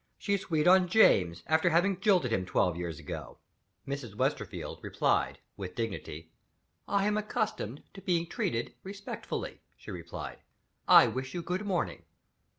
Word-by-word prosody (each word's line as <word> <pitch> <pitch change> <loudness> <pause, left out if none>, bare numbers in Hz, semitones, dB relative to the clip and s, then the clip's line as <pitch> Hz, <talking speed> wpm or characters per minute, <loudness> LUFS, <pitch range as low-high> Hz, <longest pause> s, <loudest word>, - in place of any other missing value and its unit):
"She's 200 -2 0
sweet 160 -3 0
on 185 0 +6
James, 90 - +4
after 160 +2 +3
having 175 +3 +2
jilted 180 - +3
him 95 - +1
twelve 90 -1 +1
years 85 -3 -4
ago!" - - -7 0.5
Mrs. 135 -7 -5
Westerfield - - -2
replied - - +1 0.2
with 95 -2 -6
dignity. 90 -8 -5 0.6
"I 200 -1 +2
am 210 0 +2
accustomed 210 - -3
to 195 - -10
be 170 -3 +1
treated 120 -8 -2
respectfully," 195 +1 -6 0.2
she - - -10
replied. 80 -6 -7 0.5
"I - - +9
wish 130 +3 -3
you 175 - -3
good 180 +5 -2
morning." 185 -4 -1
160 Hz, 145 wpm, -30 LUFS, -, 0.6 s, I